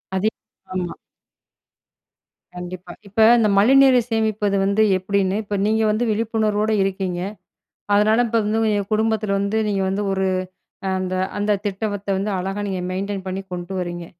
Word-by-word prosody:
அதே 195 Hz, +3 st, +2 dB, 0.4 s
ஆமா. 180 Hz, -2 st, -2 dB, 1.6 s
கண்டிப்பா. 180 Hz, 0 st, -7 dB, 0.2 s
இப்ப 220 Hz, +3 st, +3 dB
இந்த 220 Hz, -2 st, +3 dB
மழைநீரை 260 Hz, +4 st, +6 dB
சேமிப்பது 215 Hz, -2 st, 0 dB
வந்து 200 Hz, +2 st, +2 dB, 0.2 s
எப்டின்னு 190 Hz, 0 st, 0 dB
இப்போ 205 Hz, 0 st, -4 dB
நீங்க 220 Hz, +1 st, +2 dB
வந்து 215 Hz, +3 st, 0 dB
விழிப்புணர்வோட 215 Hz, -1 st, 0 dB
இருக்கீங்க. 190 Hz, -2 st, -2 dB, 0.8 s
அதனால 215 Hz, +3 st, +4 dB
இப்ப 230 Hz, 0 st, +1 dB
வந்து 215 Hz, +2 st, 0 dB
எங்க 205 Hz, -1 st, 0 dB
குடும்பத்தில 215 Hz, -2 st, +1 dB
வந்து 200 Hz, +2 st, 0 dB
நீங்க 200 Hz, -2 st, 0 dB
வந்து 195 Hz, +2 st, -1 dB
ஒரு 190 Hz, 0 st, 0 dB, 0.7 s
அந்த 185 Hz, 0 st, -2 dB, 0.2 s
அந்த 205 Hz, +1 st, 0 dB
திட்டத்த 205 Hz, 0 st, -3 dB
வந்து 200 Hz, +2 st, -2 dB
அழகா 195 Hz, +3 st, -3 dB
நீங்க 190 Hz, -2 st, -2 dB
மெயின்டெயின் 195 Hz, +1 st, -3 dB
பண்ணி 190 Hz, +1 st, -3 dB
கொண்டு 175 Hz, +1 st, -5 dB
வர்றீங்க. 175 Hz, -1 st, -4 dB
205 Hz, 140 wpm, -21 LUFS, 190-215 Hz, 1.6 s, மழைநீரை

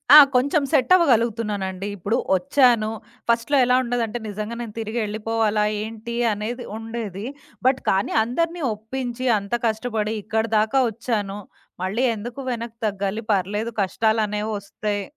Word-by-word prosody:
ఆ! -, -, +13 dB, 0.2 s
కొంచెం 280 Hz, +4 st, +3 dB
సెట్ 260 Hz, -, +2 dB
అవ్వగలుగుతున్నానండి. 215 Hz, -, +1 dB
ఇప్పుడు 200 Hz, +6 st, 0 dB, 0.2 s
ఒచ్చాను. 245 Hz, -2 st, +3 dB, 0.4 s
ఫస్ట్‌లో 235 Hz, +5 st, +2 dB
ఎలా 250 Hz, +1 st, +4 dB
ఉండదంటే 240 Hz, -1 st, -1 dB
నిజంగా 215 Hz, +3 st, -4 dB
నేను 220 Hz, -3 st, -6 dB
తిరిగెళ్ళిపోవాలా 220 Hz, -1 st, 0 dB, 0.2 s
ఏంటి 225 Hz, +1 st, -6 dB, 0.2 s
అనేది 230 Hz, +4 st, -4 dB
ఉండేది. 225 Hz, -3 st, -5 dB, 0.4 s
బట్ 260 Hz, 0 st, +3 dB
కానీ 195 Hz, +1 st, +1 dB
అందరిని 335 Hz, +8 st, -1 dB
ఒప్పించి 245 Hz, +3 st, -4 dB
అంతా 200 Hz, +4 st, -2 dB
కష్టబడి 220 Hz, -1 st, -1 dB
ఇక్కడిదాకా 220 Hz, +3 st, +1 dB
ఒచ్చాను. 210 Hz, -3 st, -2 dB, 0.5 s
మళ్ళీ 205 Hz, +7 st, 0 dB
ఎందుకు 235 Hz, +5 st, -7 dB
వెనక్కి 235 Hz, -1 st, -5 dB
తగ్గాలి 200 Hz, +2 st, -2 dB
పర్లేదు 205 Hz, +4 st, 0 dB
కష్టాలనేవొస్తయి. 210 Hz, 0 st, -1 dB
225 Hz, 115 wpm, -23 LUFS, 210-240 Hz, 0.5 s, ఆ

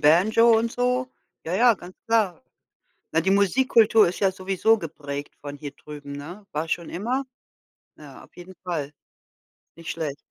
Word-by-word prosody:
Banjo 220 Hz, +9 st, +5 dB
und 230 Hz, +1 st, 0 dB
so. 250 Hz, +1 st, 0 dB, 0.4 s
Ja, 165 Hz, -, -4 dB
ja, 235 Hz, 0 st, +5 dB
ganz 180 Hz, 0 st, -13 dB
klar. 225 Hz, -3 st, +1 dB, 0.7 s
Na, 160 Hz, +1 st, +2 dB
die 190 Hz, -, +1 dB
Musikkultur 220 Hz, +1 st, +4 dB
ist 175 Hz, -, -4 dB
ja 195 Hz, -2 st, +3 dB
sowieso 195 Hz, +4 st, +1 dB
geprägt 145 Hz, -4 st, -7 dB
von 145 Hz, 0 st, -7 dB
hier 145 Hz, 0 st, -7 dB
drüben, 145 Hz, 0 st, -11 dB
ne? 170 Hz, +9 st, -8 dB
War 155 Hz, +2 st, -2 dB
schon 170 Hz, -2 st, -2 dB
immer. 245 Hz, +9 st, -1 dB, 0.7 s
Ja, -, -, -13 dB
auf -, -, -20 dB
jeden 180 Hz, +2 st, -11 dB
Fall. 150 Hz, -5 st, -3 dB, 0.8 s
Nicht 165 Hz, -1 st, -7 dB
schlecht. 155 Hz, -4 st, -3 dB
185 Hz, 155 wpm, -24 LUFS, 155-225 Hz, 0.8 s, Banjo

